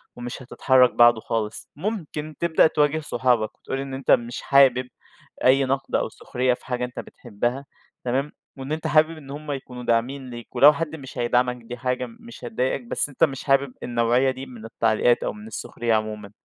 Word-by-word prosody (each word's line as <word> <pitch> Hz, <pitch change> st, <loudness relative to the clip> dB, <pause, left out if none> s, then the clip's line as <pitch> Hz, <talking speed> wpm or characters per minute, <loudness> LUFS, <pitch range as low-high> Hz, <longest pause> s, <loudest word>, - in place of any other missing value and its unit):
ومش 120 Hz, +1 st, -7 dB
هتتحرك 130 Hz, 0 st, +3 dB
بعده 120 Hz, -1 st, +6 dB
خالص؟ 110 Hz, -1 st, -3 dB
ممكن 155 Hz, -5 st, -4 dB
تبدأ 170 Hz, -2 st, +4 dB
تواجه 150 Hz, 0 st, +1 dB
صحابك، 125 Hz, -7 st, 0 dB
وتقول 135 Hz, -, -4 dB
إن 135 Hz, 0 st, -5 dB
أنتَ 135 Hz, 0 st, -1 dB
مش 120 Hz, 0 st, +2 dB
حابب 130 Hz, -2 st, +4 dB, 0.6 s
أي 135 Hz, +1 st, +5 dB
نقد 135 Hz, +1 st, -2 dB
أو -, -, +1 dB
سخرية 125 Hz, 0 st, -1 dB
في -, -, -10 dB
حاجة 125 Hz, -1 st, -2 dB
أنت 125 Hz, -, -8 dB
بتحبها. 120 Hz, +4 st, -4 dB, 0.4 s
تمام؟ 135 Hz, +4 st, -1 dB, 0.3 s
وإن 135 Hz, +2 st, -7 dB
أنت 155 Hz, +1 st, -2 dB
حابب 155 Hz, +1 st, +3 dB
إن 140 Hz, -3 st, -13 dB
هم 150 Hz, +1 st, -6 dB
يكونوا 130 Hz, -3 st, -6 dB
داعمين 125 Hz, +3 st, 0 dB
ليك. 120 Hz, -1 st, -10 dB
ولو 145 Hz, +2 st, +8 dB
حد 160 Hz, +1 st, -4 dB
مش 135 Hz, -4 st, -10 dB
هيدعمك 125 Hz, +1 st, +1 dB
دي 120 Hz, +2 st, -7 dB
حاجة 125 Hz, 0 st, -1 dB
م 230 Hz, -, -13 dB
مش 235 Hz, 0 st, -11 dB
هتضايقك، 130 Hz, -, -1 dB
بس 235 Hz, -10 st, -2 dB
أنتَ 145 Hz, +3 st, -1 dB
مش 135 Hz, -4 st, +1 dB
حابب 135 Hz, -2 st, +2 dB
النوعية 120 Hz, +2 st, +2 dB
دي 130 Hz, +1 st, -7 dB
من 120 Hz, -4 st, -11 dB
التعليقات 115 Hz, +1 st, +2 dB
أو -, -, -2 dB
من 210 Hz, +1 st, -11 dB
السخرية 120 Hz, -, -3 dB
عمومًا. 105 Hz, -2 st, -2 dB
130 Hz, 185 wpm, -24 LUFS, 120-145 Hz, 0.6 s, ولو